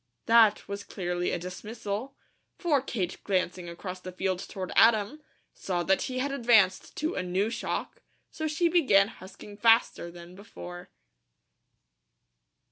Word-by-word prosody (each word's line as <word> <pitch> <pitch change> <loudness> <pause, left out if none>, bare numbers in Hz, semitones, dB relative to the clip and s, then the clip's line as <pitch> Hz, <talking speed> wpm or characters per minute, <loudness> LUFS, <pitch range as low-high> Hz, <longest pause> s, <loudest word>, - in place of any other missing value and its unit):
That 225 -2 +5
was 200 0 -5
clearly 175 -3 -3
a - - -1
dismissal, 210 +7 -6 0.4
for 300 -6 +2
Kate 200 -9 -4
glancing 180 -2 -1
across 180 +2 -7
the 185 0 -8
field 185 0 -2
toward 185 -2 -5
Adam, 225 +6 +4 0.3
saw 175 -2 -2
that 195 +2 +2
he 255 - -4
had 275 +2 -1
advanced 225 -8 +3
to 310 +2 -1
a - - -2
new 185 +4 -1
shock, 480 - -4 0.3
so 315 0 -3
she 320 +3 +1
began 255 - +4
husking 205 +2 -12
faster 225 -5 +3
than 170 0 -12
before. 180 -2 -10
200 Hz, 135 wpm, -28 LUFS, 180-235 Hz, 0.4 s, That